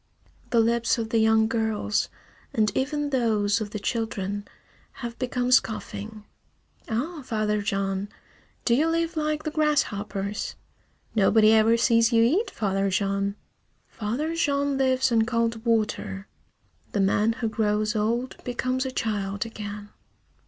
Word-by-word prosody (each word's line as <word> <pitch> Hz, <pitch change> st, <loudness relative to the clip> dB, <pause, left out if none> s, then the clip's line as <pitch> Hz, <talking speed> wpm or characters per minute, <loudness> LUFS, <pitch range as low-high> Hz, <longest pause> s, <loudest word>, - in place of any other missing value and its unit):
The 235 Hz, -, +3 dB
lips 235 Hz, +1 st, +2 dB
of 225 Hz, -1 st, -3 dB
the 230 Hz, -, +3 dB
young 220 Hz, 0 st, +4 dB
girls, 220 Hz, -2 st, 0 dB, 0.5 s
and 215 Hz, -2 st, +2 dB
even 290 Hz, +2 st, -1 dB
those 220 Hz, -5 st, +1 dB
of 210 Hz, -, -3 dB
the 210 Hz, -, -5 dB
children, 205 Hz, -2 st, -3 dB, 0.5 s
have 235 Hz, -2 st, -6 dB
become 250 Hz, 0 st, -1 dB
scoffing. 215 Hz, -3 st, 0 dB, 0.6 s
"Ah, 290 Hz, +9 st, -2 dB
Father 215 Hz, -3 st, 0 dB
Jean! 195 Hz, -1 st, -1 dB, 0.6 s
Do 235 Hz, -, +3 dB
you 295 Hz, +7 st, +3 dB
live 330 Hz, +1 st, 0 dB
like 305 Hz, -1 st, -1 dB
the 310 Hz, -, -3 dB
grasshoppers? 210 Hz, -10 st, -1 dB, 0.6 s
Nobody 215 Hz, +1 st, +5 dB
ever 225 Hz, +1 st, +5 dB
sees 230 Hz, 0 st, +4 dB
you 230 Hz, -1 st, +5 dB
eat, 345 Hz, -, +2 dB
Father 195 Hz, -1 st, 0 dB
Jean! 200 Hz, +1 st, 0 dB, 0.5 s
Father 245 Hz, +10 st, -2 dB
Jean 285 Hz, -3 st, +1 dB
lives 260 Hz, -1 st, +2 dB
on 230 Hz, -1 st, +4 dB
cold 230 Hz, -2 st, 0 dB
water. 215 Hz, -3 st, -1 dB, 0.7 s
The 205 Hz, -, 0 dB
man 205 Hz, +3 st, +2 dB
who 230 Hz, 0 st, -2 dB
grows 215 Hz, 0 st, 0 dB
old 230 Hz, +4 st, -1 dB
becomes 255 Hz, +1 st, -1 dB
a -, -, -4 dB
child 205 Hz, -3 st, -2 dB
again! 210 Hz, -2 st, -7 dB
225 Hz, 135 wpm, -26 LUFS, 210-255 Hz, 0.7 s, Nobody